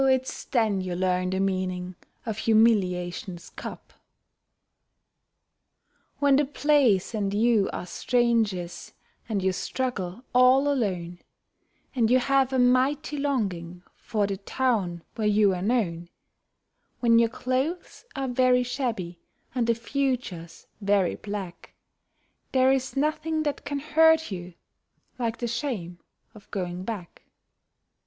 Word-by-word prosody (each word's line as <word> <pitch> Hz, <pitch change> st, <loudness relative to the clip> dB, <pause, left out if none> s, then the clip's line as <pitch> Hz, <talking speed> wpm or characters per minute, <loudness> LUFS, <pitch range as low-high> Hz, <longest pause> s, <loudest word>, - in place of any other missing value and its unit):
it's 260 Hz, 0 st, 0 dB
then 220 Hz, -7 st, +1 dB
you 180 Hz, -1 st, -3 dB
learn 180 Hz, 0 st, 0 dB
the 190 Hz, +1 st, -1 dB
meaning 185 Hz, -1 st, -1 dB, 0.3 s
of 220 Hz, -2 st, -3 dB
humiliation's 185 Hz, -6 st, +1 dB
cup. -, -, -9 dB, 2.2 s
When 280 Hz, -2 st, +4 dB
the 295 Hz, -, +3 dB
place 275 Hz, -9 st, +2 dB
and 205 Hz, -3 st, -1 dB
you 215 Hz, -1 st, +3 dB
are -, -, -5 dB
strangers 225 Hz, -5 st, 0 dB, 0.4 s
and 200 Hz, -4 st, -1 dB
you 190 Hz, -, +2 dB
struggle 210 Hz, -1 st, -3 dB
all 255 Hz, +3 st, +5 dB
alone, 185 Hz, -11 st, -1 dB, 0.7 s
And 230 Hz, -4 st, +2 dB
you 255 Hz, -, +5 dB
have 270 Hz, 0 st, +2 dB
a 260 Hz, -, 0 dB
mighty 260 Hz, +4 st, +2 dB
longing 190 Hz, -12 st, -2 dB
for 210 Hz, -2 st, -2 dB
the 200 Hz, -1 st, -3 dB
town 195 Hz, -6 st, -1 dB
where 220 Hz, -2 st, -1 dB
you 205 Hz, -2 st, +4 dB
are 180 Hz, -, -3 dB
known; 180 Hz, -6 st, -1 dB, 0.9 s
When 230 Hz, -1 st, +5 dB
your 230 Hz, -1 st, +3 dB
clothes 260 Hz, +9 st, -3 dB
are 270 Hz, -1 st, -2 dB
very 250 Hz, 0 st, +3 dB
shabby 230 Hz, -9 st, -3 dB, 0.3 s
and 245 Hz, -3 st, 0 dB
the 230 Hz, -, +3 dB
future's 235 Hz, -, -3 dB, 0.2 s
very 200 Hz, -2 st, +2 dB
black, 200 Hz, -4 st, -7 dB, 0.8 s
There 260 Hz, 0 st, +5 dB
is 270 Hz, 0 st, -1 dB
nothing 310 Hz, +2 st, 0 dB
that 290 Hz, -2 st, -3 dB
can 285 Hz, -, -2 dB
hurt 320 Hz, 0 st, +3 dB
you 180 Hz, -2 st, -7 dB, 0.6 s
like 230 Hz, -2 st, -1 dB
the 240 Hz, -, -3 dB
shame 225 Hz, -8 st, -4 dB, 0.3 s
of 210 Hz, -3 st, -16 dB
going 180 Hz, -1 st, -4 dB
back. 200 Hz, -6 st, -6 dB
225 Hz, 125 wpm, -26 LUFS, 185-260 Hz, 2.2 s, all